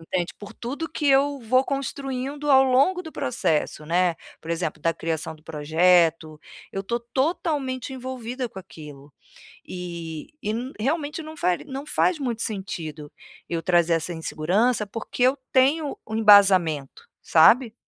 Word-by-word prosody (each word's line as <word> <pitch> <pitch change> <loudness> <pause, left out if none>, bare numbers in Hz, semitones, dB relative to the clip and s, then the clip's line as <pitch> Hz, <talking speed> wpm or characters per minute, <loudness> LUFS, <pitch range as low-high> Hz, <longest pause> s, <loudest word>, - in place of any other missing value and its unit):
entende, 175 +2 -3
por 205 +1 -10
tudo 280 +7 -5
que 305 -1 -3
eu 280 +1 +3
vou 255 +3 +2
construindo 275 +1 -4
ao 265 -1 +7
longo 275 +8 +3
do 320 - -9
processo, 150 +3 -1
né. 175 +2 +2 0.3
Por 160 - -12
exemplo, 165 -2 -2
da 165 +1 0
criação 160 0 -3
do 155 - -20
projeto, 160 0 +2 0.3
eu 195 - -3
estou 235 +4 -2
totalmente 270 -3 -1
envolvida 255 -1 -5
com 190 - -11
aquilo. 150 -6 -13 0.5
E 170 -3 -7
e 210 - -3
n 245 +5 -3
realmente 295 +5 -2
não 315 0 -10
fari 180 -6 0
não 275 +1 -7
faz 345 +2 +1
muito 240 -5 -3
sentido 160 -8 -5 0.4
eu 165 -1 -2
trazer 170 -1 +3
essa 165 +2 -1
insegurança, 190 +9 0
porque 225 +3 -7
eu 260 +3 +4 0.2
tenho 280 +3 +3
um 220 - -3
embasamento, 190 -9 +4 0.2
sabe. 225 +8 +5
215 Hz, 150 wpm, -24 LUFS, 165-265 Hz, 0.5 s, ao